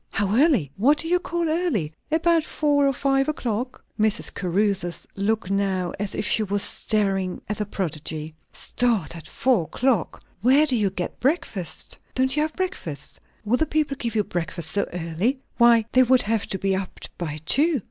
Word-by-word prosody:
"How 200 Hz, +1 st, 0 dB
early? 250 Hz, -, +3 dB
What 275 Hz, +9 st, +4 dB
do 325 Hz, -, -4 dB
you 360 Hz, +1 st, +3 dB
call 345 Hz, -1 st, -2 dB
early?" 310 Hz, -, 0 dB, 0.2 s
"About 330 Hz, +1 st, +3 dB
four 290 Hz, -2 st, +2 dB
or -, -, +3 dB
five 270 Hz, +1 st, +1 dB
o'clock." 250 Hz, -3 st, -3 dB
Mrs. 215 Hz, +1 st, +1 dB
Caruthers 185 Hz, -1 st, -1 dB
looked 200 Hz, 0 st, -1 dB
now 195 Hz, -3 st, 0 dB
as 205 Hz, -1 st, -1 dB
if -, -, -2 dB
she 220 Hz, -, +2 dB
were 205 Hz, -1 st, -1 dB
staring 195 Hz, -3 st, 0 dB
at 210 Hz, 0 st, -3 dB
a 210 Hz, -, -2 dB
prodigy. 155 Hz, -4 st, -4 dB, 0.2 s
"Start 225 Hz, -11 st, 0 dB
at 160 Hz, -2 st, -8 dB
four 240 Hz, -10 st, +1 dB
o'clock! 250 Hz, +7 st, 0 dB, 0.2 s
Where 265 Hz, +7 st, +5 dB
do 270 Hz, -4 st, +1 dB
you 210 Hz, -4 st, +2 dB
get 180 Hz, -1 st, -5 dB
breakfast? 245 Hz, -, -2 dB, 0.2 s
Don't 260 Hz, +1 st, +2 dB
you 300 Hz, -, +2 dB
have 310 Hz, 0 st, -1 dB
breakfast? 170 Hz, -, -5 dB, 0.3 s
Will 230 Hz, +4 st, +2 dB
the 315 Hz, -, +1 dB
people 300 Hz, -2 st, 0 dB
give 235 Hz, -4 st, -3 dB
you 210 Hz, -, +3 dB
breakfast 170 Hz, -3 st, -4 dB
so 205 Hz, -, -1 dB
early? 180 Hz, -, -1 dB, 0.2 s
Why, 235 Hz, -2 st, +6 dB
they 255 Hz, -, +5 dB
would 255 Hz, 0 st, +4 dB
have 220 Hz, 0 st, 0 dB
to 190 Hz, -, -2 dB
be 195 Hz, 0 st, 0 dB
up 190 Hz, -1 st, -5 dB, 0.2 s
by 155 Hz, -4 st, -3 dB
two." 300 Hz, -, +4 dB
215 Hz, 180 wpm, -24 LUFS, 190-275 Hz, 0.3 s, Why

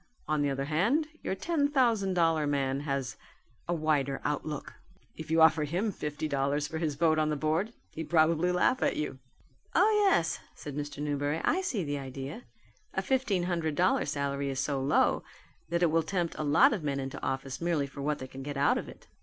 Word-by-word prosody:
On 155 Hz, -1 st, +1 dB
the 145 Hz, -, +2 dB
other 135 Hz, 0 st, -2 dB
hand 225 Hz, -, +1 dB
your -, -, -2 dB
ten 300 Hz, -, +1 dB
thousand 230 Hz, -9 st, +2 dB
dollar 165 Hz, -3 st, +2 dB
man 135 Hz, -1 st, 0 dB
has 140 Hz, -3 st, -3 dB, 0.5 s
a 175 Hz, -, 0 dB
wider 145 Hz, -4 st, 0 dB
outlook. 150 Hz, 0 st, -3 dB, 0.4 s
If 160 Hz, -1 st, -8 dB
you 160 Hz, 0 st, +5 dB
offer 160 Hz, -1 st, +5 dB
him 180 Hz, +9 st, -1 dB
fifty 150 Hz, -3 st, -4 dB
dollars 140 Hz, +1 st, 0 dB
for 160 Hz, +1 st, -4 dB
his 155 Hz, -3 st, -1 dB
vote 155 Hz, +1 st, +3 dB
on 155 Hz, 0 st, +2 dB
the 150 Hz, -, 0 dB
board, 155 Hz, +9 st, 0 dB, 0.2 s
he'd 160 Hz, -1 st, -6 dB
probably 165 Hz, +1 st, +3 dB
laugh 180 Hz, +8 st, +2 dB
at -, -, +2 dB
you." 145 Hz, -3 st, -3 dB, 0.6 s
"Ah, -, -, +6 dB
yes," 395 Hz, -, +3 dB, 0.2 s
said 145 Hz, -2 st, -8 dB
Mr. 145 Hz, 0 st, -4 dB
Newberry, 145 Hz, +1 st, -1 dB
"I 370 Hz, -, +2 dB
see 260 Hz, -, -1 dB
the 145 Hz, -2 st, -2 dB
idea. 135 Hz, 0 st, -7 dB, 0.5 s
A 190 Hz, -, 0 dB
fifteen 230 Hz, -7 st, +1 dB
hundred 170 Hz, -4 st, -1 dB
dollar 180 Hz, +4 st, +2 dB
salary 140 Hz, -1 st, -1 dB
is 135 Hz, -1 st, -3 dB
so 135 Hz, 0 st, -1 dB
low 135 Hz, -, +2 dB, 0.5 s
that 170 Hz, +1 st, +1 dB
it 165 Hz, -, +4 dB
will 165 Hz, +1 st, +3 dB
tempt 170 Hz, 0 st, -2 dB
a -, -, -3 dB
lot 170 Hz, -, +5 dB
of 205 Hz, -, -2 dB
men 140 Hz, -2 st, -1 dB
into 135 Hz, 0 st, -5 dB
office 135 Hz, +1 st, -3 dB
merely 165 Hz, -4 st, +1 dB
for 140 Hz, 0 st, -9 dB
what 150 Hz, +1 st, 0 dB
they 130 Hz, -, -7 dB
can 130 Hz, +1 st, -9 dB
get 145 Hz, +1 st, -5 dB
out 140 Hz, +1 st, +3 dB
of -, -, -7 dB
it." -, -, -14 dB
155 Hz, 205 wpm, -30 LUFS, 140-175 Hz, 0.6 s, Ah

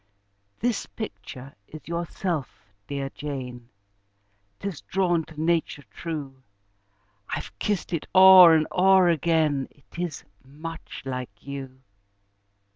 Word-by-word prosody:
"This 240 Hz, -3 st, -1 dB
picture 140 Hz, -, -8 dB
is 155 Hz, -, -11 dB
yourself, 170 Hz, -, -4 dB, 0.2 s
dear 140 Hz, -1 st, -4 dB
Jane 125 Hz, -5 st, -6 dB, 0.9 s
'Tis 195 Hz, -6 st, -5 dB
drawn 175 Hz, -3 st, +1 dB
to 155 Hz, -2 st, -12 dB
nature 160 Hz, -2 st, 0 dB
true: 145 Hz, -5 st, -6 dB, 0.9 s
I've -, -, -5 dB
kissed 205 Hz, -3 st, -2 dB
it 165 Hz, -, -2 dB
o'er 185 Hz, -3 st, +10 dB
and 155 Hz, -1 st, +3 dB
o'er 190 Hz, -1 st, +5 dB
again, 155 Hz, -4 st, +1 dB
It 145 Hz, +4 st, -15 dB
is 175 Hz, -3 st, -3 dB, 0.2 s
much 155 Hz, +5 st, -9 dB
like 125 Hz, -6 st, -6 dB
you." 135 Hz, -2 st, -8 dB
155 Hz, 110 wpm, -25 LUFS, 135-175 Hz, 0.9 s, o'er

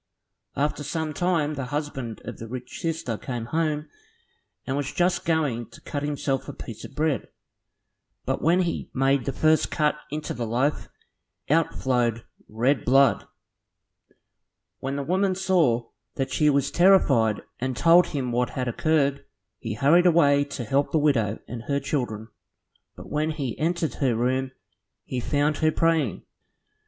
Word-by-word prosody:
After 145 Hz, +1 st, -1 dB
some 155 Hz, +1 st, -3 dB
time 165 Hz, -3 st, 0 dB
the 135 Hz, -3 st, -4 dB
husband 135 Hz, -5 st, -4 dB
of -, -, -7 dB
the 115 Hz, -, -7 dB
rich 125 Hz, +1 st, -7 dB
sister 160 Hz, -, -3 dB
came 120 Hz, -3 st, -4 dB
home, 155 Hz, +2 st, -1 dB, 0.8 s
and 130 Hz, -, -2 dB
was 145 Hz, -1 st, -2 dB
just 175 Hz, 0 st, +1 dB
going 145 Hz, -9 st, 0 dB
to -, -, -15 dB
cut 145 Hz, -, -4 dB
himself 145 Hz, -2 st, -2 dB
a -, -, -5 dB
piece 115 Hz, -, -9 dB
of 135 Hz, -, -10 dB
bread, 150 Hz, -5 st, 0 dB, 1.0 s
but -, -, -1 dB
when 175 Hz, +4 st, +3 dB
he 170 Hz, -, -3 dB
made 135 Hz, -1 st, +2 dB
the 135 Hz, -, -1 dB
first 155 Hz, +4 st, +2 dB
cut 150 Hz, -1 st, +1 dB, 0.2 s
into 150 Hz, +1 st, -4 dB
the 120 Hz, -1 st, -4 dB
loaf, 130 Hz, +6 st, 0 dB, 0.6 s
out 165 Hz, +1 st, +2 dB
flowed 120 Hz, -3 st, 0 dB, 0.3 s
red 120 Hz, +4 st, +1 dB
blood. 135 Hz, 0 st, +4 dB, 1.5 s
When 135 Hz, +1 st, -3 dB
the 140 Hz, -, -2 dB
woman 185 Hz, +4 st, +1 dB
saw 165 Hz, -12 st, +2 dB, 0.3 s
that 135 Hz, -, -2 dB
she 150 Hz, -1 st, +3 dB
was 140 Hz, -1 st, +1 dB
terrified 140 Hz, -, +4 dB, 0.2 s
and 130 Hz, -1 st, -2 dB
told 170 Hz, +1 st, +6 dB
him 130 Hz, -5 st, -3 dB
what 125 Hz, +1 st, +1 dB
had 125 Hz, -1 st, -3 dB
occurred. 140 Hz, +2 st, +1 dB, 0.4 s
He 110 Hz, -3 st, -4 dB
hurried 165 Hz, +9 st, +5 dB
away 145 Hz, -4 st, +4 dB
to 140 Hz, -3 st, -6 dB
help 135 Hz, +5 st, 0 dB
the -, -, +2 dB
widow 120 Hz, -9 st, +2 dB
and 120 Hz, -2 st, -6 dB
her 140 Hz, -1 st, +1 dB
children, 120 Hz, -6 st, -3 dB, 0.7 s
but -, -, -11 dB
when 150 Hz, +1 st, 0 dB
he 140 Hz, -7 st, -3 dB
entered 165 Hz, 0 st, 0 dB
her 130 Hz, -5 st, +2 dB
room, 130 Hz, +3 st, 0 dB, 0.6 s
he 125 Hz, -, -3 dB
found 145 Hz, +3 st, 0 dB
her 155 Hz, 0 st, +2 dB
praying. 160 Hz, -, +1 dB
140 Hz, 155 wpm, -25 LUFS, 125-155 Hz, 1.5 s, told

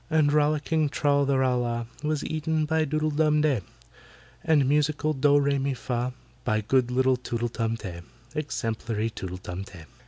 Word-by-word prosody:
And 155 Hz, -2 st, +3 dB
rollicking 150 Hz, 0 st, +2 dB
TRAL 140 Hz, -1 st, +2 dB
THE 140 Hz, -1 st, +2 dB
RAL 130 Hz, -1 st, +2 dB
LAH 120 Hz, -1 st, -2 dB, 0.2 s
Was 150 Hz, -1 st, -1 dB
eaten 155 Hz, 0 st, -1 dB
by 160 Hz, +1 st, +1 dB
DOODLE 155 Hz, +1 st, 0 dB
DUM 150 Hz, 0 st, +3 dB
DEY, 145 Hz, -8 st, +2 dB, 0.8 s
And 150 Hz, -5 st, +3 dB
musical 150 Hz, +2 st, +1 dB
DOH 145 Hz, +1 st, +4 dB
REH 140 Hz, -1 st, +2 dB
MI 135 Hz, 0 st, 0 dB
FAH 125 Hz, 0 st, -2 dB, 0.3 s
By 110 Hz, 0 st, +1 dB
good 125 Hz, +3 st, +2 dB
little 130 Hz, +1 st, +2 dB
TOOTLE 120 Hz, -1 st, -3 dB
DUM 115 Hz, -1 st, -2 dB
TEH— 90 Hz, -6 st, -7 dB, 0.3 s
Exemplary 115 Hz, -6 st, -2 dB
TOOTLE 90 Hz, -3 st, -6 dB
TUM 90 Hz, 0 st, -6 dB
TEH! 85 Hz, -4 st, -12 dB
140 Hz, 165 wpm, -26 LUFS, 120-150 Hz, 0.8 s, DOH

